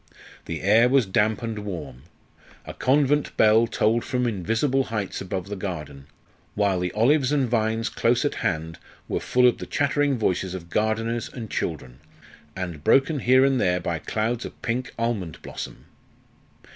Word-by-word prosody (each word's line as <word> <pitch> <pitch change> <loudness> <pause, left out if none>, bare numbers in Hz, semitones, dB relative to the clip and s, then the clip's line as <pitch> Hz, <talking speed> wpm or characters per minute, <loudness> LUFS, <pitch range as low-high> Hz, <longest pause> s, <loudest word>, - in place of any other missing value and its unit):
The 80 - -5
air 110 +5 +5
was 135 -2 +4
damp 105 +3 +1
and 115 -2 -3
warm. 85 -10 -7 0.6
A - - -7
convent 145 +2 +1
bell 110 +2 +5
tolled 115 +2 +1
from 125 -2 -1
invisible 115 - 0
heights 105 -4 -4
above 95 0 -4
the 105 - -4
garden; 75 -8 -6 0.5
while 100 -3 +1
the 90 0 -2
olives 130 +5 +3
and 140 -3 +2
vines 115 -1 0
close 120 +4 +1
at 145 - 0
hand 80 -5 -2 0.3
were - - -1
full 125 0 +3
of 120 - +1
the - - -6
chattering 145 -1 +1
voices 95 -3 -1
of 85 -2 -9
gardeners 115 +2 -1
and 115 -5 -8
children, 65 -6 -4 0.6
and 90 -5 -5
broken 140 - +3
here 130 +2 +5
and 135 -2 +2
there 90 0 +2
by 85 -2 -3
clouds 115 +7 -2
of - - -9
pink 125 +2 -2
almond 110 -9 -2
blossom. - - -8
110 Hz, 160 wpm, -24 LUFS, 95-125 Hz, 0.6 s, air